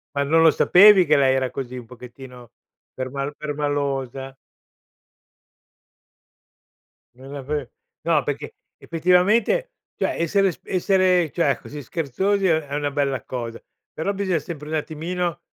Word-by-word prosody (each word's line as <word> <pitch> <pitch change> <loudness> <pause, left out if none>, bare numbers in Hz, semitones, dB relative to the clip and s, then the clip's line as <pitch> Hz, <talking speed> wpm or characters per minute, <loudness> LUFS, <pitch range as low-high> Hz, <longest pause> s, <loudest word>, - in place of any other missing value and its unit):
Ma 140 - +1
non 160 +3 +3
lo 160 -1 +7
sapevi 195 0 +6
che 150 -1 +4
lei 135 -1 +3
era 130 -2 -1
così? 130 -1 -6
Un 120 - -8
pochettino 125 0 -13 0.4
perma 140 +2 -4
permalosa? 140 -3 -3 2.8
Non 135 +2 -12
l'av 145 -1 -4 0.3
no, 160 -3 +2
perché 145 0 -4 0.2
effettivamente, 195 - +2 0.2
cioè, - - -1
essere 190 +3 +2
s - - -14
essere, 185 -3 +2
cioè, 145 -7 +1
così 145 0 -8
scherzosi 190 - -1
è 160 -2 +3
è 140 - -4
una 145 0 -1
bella 140 -2 -1
cosa, 115 -2 -6 0.3
però 195 +6 -2
bisogna 190 -4 -1
sempre 150 0 -8
un 160 - -3
attimino 165 +3 -3
150 Hz, 130 wpm, -22 LUFS, 135-175 Hz, 2.8 s, lo